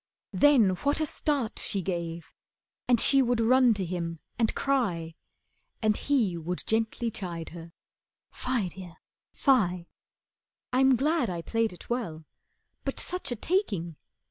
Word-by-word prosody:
Then 275 -9 +5
what 285 - 0
a 310 - +1
start 280 -6 -1
She 195 -2 0
gave, 170 -2 -4 0.5
and 245 -2 +4
she 275 +3 +6
would 245 -2 +1
run 250 +2 +5
to 195 -2 -2
him 170 -1 -4 0.2
and 225 -2 +1
cry, 190 -13 0 0.7
And 215 -2 +2
he 220 -13 0
would 175 +3 -3
gently 225 +1 0
chide 170 -5 -6
her, 165 0 -10 0.6
"Fie, 240 -7 -1
Dear, 180 -2 -11 0.3
fie. 185 - +2 0.9
I'm 265 +1 +5
glad 295 - +1
I 170 -2 -4
played 225 +2 0
it 180 - -12
well. 165 -11 -3 0.6
But - - -3
such 360 -7 -3
a - - -1
taking! 210 - -1
220 Hz, 140 wpm, -28 LUFS, 175-260 Hz, 0.9 s, she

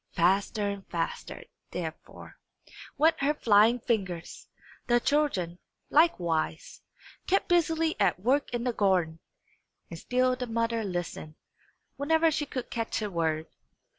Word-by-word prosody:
Faster 195 +4 +2
and 200 -1 -5
faster, 165 -1 -4 0.3
therefore, - - -8 0.6
went 320 +2 +3
her 290 +2 +2
flying 225 -1 +4
fingers. 190 -8 -3 0.4
The 240 0 +4
children, 220 - 0 0.3
likewise, 170 - +1 0.5
kept 390 +2 +2
busily 325 -2 +2
at - - +2
work 260 +8 +1
in 240 -1 -2
the 245 -1 0
garden, 180 -6 +1 0.7
and 165 - -7
still 255 +4 +1
the 250 0 -5
mother 230 0 -1
listened, 175 -5 -5 0.6
whenever 320 +3 +3
she 295 -1 -2
could 255 -2 -5
catch 230 -2 -2
a 210 - -3
word. 160 -2 -1
230 Hz, 125 wpm, -28 LUFS, 180-285 Hz, 0.7 s, flying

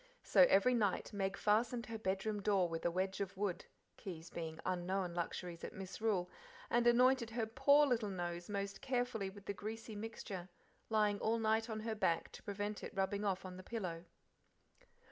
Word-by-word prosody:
So 270 - +7
every 200 +6 +5
night 210 -3 +1
Meg 195 -1 -1
fastened 230 +3 +2
her 225 -1 -5
bedroom 205 +1 -1
door 195 -3 +3
with 165 -1 -4
a - - +4
wedge 190 +3 -1
of 195 -1 -4
wood, 195 -3 -1 0.3
keys 170 -3 -7
being 160 -1 -5
unknown 185 0 -1
luxuries 170 0 -4
at - - -5
Misrule, 190 0 -1 0.4
and 240 0 +4
anointed 250 0 +5
her, 225 0 -1
poor 275 +6 +5
little 235 -6 +1
nose 175 -1 -4
most 200 -1 -3
carefully 245 -6 -1
with 200 +1 -13
the 200 - -2
greasy 220 +2 -6
mixture, 205 -4 -6 0.4
lying 210 -2 +2
all 225 +1 +1
night 220 +1 +1
on 215 -1 -3
her 225 0 -2
back 170 -6 +1
to - - -10
prevent 205 +1 -4
it - - -7
rubbing 195 +1 0
off 190 -2 0
on 185 -1 -7
the 185 - -9
pillow. 180 -7 -4
205 Hz, 180 wpm, -37 LUFS, 185-225 Hz, 0.4 s, So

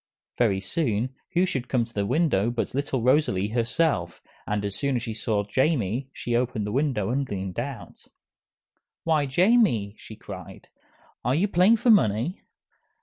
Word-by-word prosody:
Very 105 -6 +3
soon, 120 - -1 0.2
who 180 +2 +3
should 130 -8 -3
come 125 -3 +1
to 115 - -15
the 100 -1 -1
window 120 - +2
but 120 -1 -3
little 135 -3 -1
Rosalie 125 -7 +2
herself, 120 - 0 0.3
and 105 -1 -1
as 100 -1 -2
soon 140 -2 -1
as 120 - -2
she 115 -3 -4
saw 105 -1 -1
Jamie 130 - 0
she 120 -3 -3
opened 120 -3 0
the 105 - -3
window 125 -5 0
and 135 +1 -1
leaned 95 0 -4
out. 125 -3 -7 1.0
"Why, 155 -3 +2
Jamie," 175 - +3
she 110 - -11
cried, - - -10 0.5
"are 125 +3 +1
you 185 +7 +2
playing 195 +4 +4
for 235 +2 +4
money?" 125 - +2
125 Hz, 160 wpm, -25 LUFS, 105-150 Hz, 1.0 s, playing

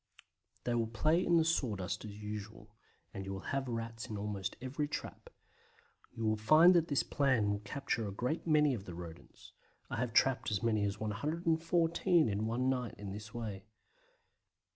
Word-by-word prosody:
They 120 - 0
will 115 -1 +1
play 155 +10 +2
in 170 - +4
the 160 - +4
sawdust 110 - -1
as 105 -1 -8
usual, 105 +1 -7 0.4
and 95 - -5
you 95 - -5
will 95 - -6
have 135 -1 -1
Rats 115 -1 -4
in 105 - -4
almost 100 -2 -3
every 135 +4 -2
trap. 315 - -6 0.8
You 115 -2 -4
will 110 0 +2
find 155 +12 +7
that 170 -2 +3
this 140 -4 +1
plan 130 -8 +2
will 100 - -1
capture 115 0 -2
a - - -4
great 125 +12 -2
many 150 -3 +4
of 100 -5 -5
the 90 - -7
Rodents. 85 -2 -11 0.4
I - - -2
have 125 -1 -1
trapped 130 +1 +3
as 105 -1 -1
many 110 -3 +2
as 100 0 -2
114 165 - +1
in 105 +1 -1
one 120 +3 0
night 125 -3 -1
in 100 -1 -6
this 105 +1 -7
way. 110 -4 -5
115 Hz, 180 wpm, -34 LUFS, 105-145 Hz, 0.8 s, find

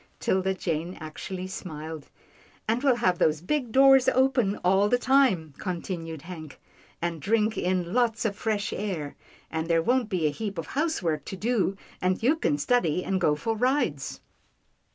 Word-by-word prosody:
'Tilda 190 0 +1
Jane 170 0 -3
actually 180 +4 -6
smiled. 160 -5 -7 0.3
" - - -30
And 230 +3 +1
we'll 270 -3 +4
have 185 -7 +1
these 155 -1 +3
big 245 - -2
doors 270 0 +6
open 255 -6 +2
all 195 +3 +4
the 245 - +4
time," 245 - +3
continued 165 -3 -4
Hank, 160 -4 -9 0.2
" - - -30
and 170 -2 -2
drink 215 +3 +1
in 180 -1 -1
lots 235 -2 +1
of 205 -2 0
fresh 210 -1 -1
air, 175 -9 -4 0.4
and 160 0 -2
there 165 -1 +2
won't 245 0 +1
be 180 -6 0
a 150 - +3
heap 200 +4 -5
of 165 - -3
housework 180 - -1
to - - -5
do, 205 -2 0 0.2
and 185 +3 0
you 275 +7 +4
can 145 - 0
study 180 -1 +1
and 190 -1 0
go 150 -4 +3
for 225 +10 -2
rides." 245 - 0
190 Hz, 175 wpm, -27 LUFS, 165-240 Hz, 0.4 s, doors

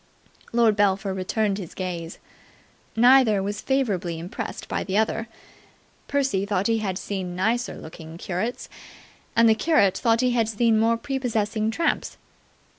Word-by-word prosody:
Lord 230 -2 +3
Belpher 195 -1 +1
returned 200 +2 -1
his 180 -5 -8
gaze. 175 -3 -5 0.8
Neither 235 -4 +5
was 205 +1 -3
favourably 200 -11 -1
impressed 170 +3 -6
by - - -2
the 195 +1 -1
other. 220 +1 0 0.8
Percy 270 -9 0
thought 200 -1 -1
he 225 0 +2
had 190 -4 -2
seen 185 -2 -4
nicer 225 +6 0
looking 160 0 -10
curates, 190 +8 -3 0.7
and 230 0 +6
the 220 - +6
curate 220 - +3
thought 230 -1 +2
he 250 -1 +2
had 230 -2 +1
seen 225 0 +2
more 230 +1 +3
prepossessing 230 -5 -1
tramps. 330 +9 -1
215 Hz, 140 wpm, -24 LUFS, 190-230 Hz, 0.8 s, and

